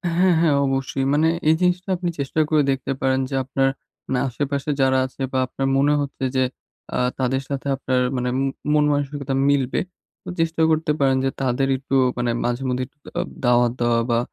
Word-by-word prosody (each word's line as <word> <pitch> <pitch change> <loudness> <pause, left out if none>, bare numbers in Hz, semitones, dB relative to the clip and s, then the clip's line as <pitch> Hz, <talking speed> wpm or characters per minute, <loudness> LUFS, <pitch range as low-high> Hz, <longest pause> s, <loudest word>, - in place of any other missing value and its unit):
হ্যাঁ, 180 +1 +4
হ্যাঁ, 160 -4 +3
অবশ্যই। 135 0 -1
মানে 155 +2 +3 0.2
এই 160 - +5
জিনিসটা 180 +1 +1
আপনি 175 0 -2
চেষ্টা 140 +3 -2
করে 155 -1 +4
দেখতে 135 0 -2
পারেন 130 0 +2
যে, 135 - -3
আপনার, 135 +1 +1 0.4
না 130 - +2
আশেপাশে 140 +3 -3
যারা 130 0 +3
আছে 130 +1 -10
বা 130 - 0
আপনার 135 +1 -2
মনে 145 +2 +3
হচ্ছে 140 -1 -5
যে, 130 - +3 0.5
আ - - 0 0.2
তাদের 130 +1 0
সাথে 140 0 -3
আপনার 130 -1 0 0.2
মানে 125 0 -1
মু 135 - +1 0.3
মন 150 -1 +4
মানসিকতা 145 -1 -2 0.2
মিলবে। 135 -3 +1 0.4
তো - - -8
চেষ্টাও 165 0 +2
করতে 155 -1 +1
পারেন 135 -1 +3
যে, - - +2
তাদের 130 +1 +1
একটু 135 +1 -3 0.2
মানে 120 -1 0
মাঝে-মধ্যেই 125 +1 -1
একটু - - -39 0.2
আ - - +2 0.2
দাওয়াত 120 0 +4
দেওয়া 120 -1 +2
বা, 115 0 +3
135 Hz, 190 wpm, -22 LUFS, 130-145 Hz, 0.5 s, এই